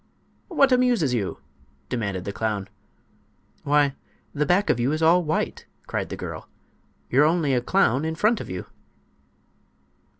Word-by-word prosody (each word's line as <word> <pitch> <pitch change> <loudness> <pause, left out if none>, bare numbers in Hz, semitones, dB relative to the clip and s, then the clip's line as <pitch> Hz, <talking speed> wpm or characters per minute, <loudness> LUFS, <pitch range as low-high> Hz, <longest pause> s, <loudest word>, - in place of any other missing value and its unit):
"What 280 -8 +3
amuses 245 - +3
you?" 105 -6 -2 0.5
demanded 100 -6 -3
the 100 - -3
clown. 105 -3 -2 1.0
"Why, 145 -2 +3 0.4
the 150 0 0
back 185 +3 +3
of 120 - -1
you 125 +4 +1
is 155 +1 -1
all 175 +2 +5
white!" 155 0 -2 0.2
cried - - -3
the - - -5
girl. - - -7 0.6
"You're 135 +4 +5
only 155 -3 +2
a 125 - +2
clown 135 - +2
in 160 0 -2
front 215 +6 +2
of - - -8
you." 90 -1 -5
150 Hz, 145 wpm, -24 LUFS, 120-180 Hz, 1.0 s, all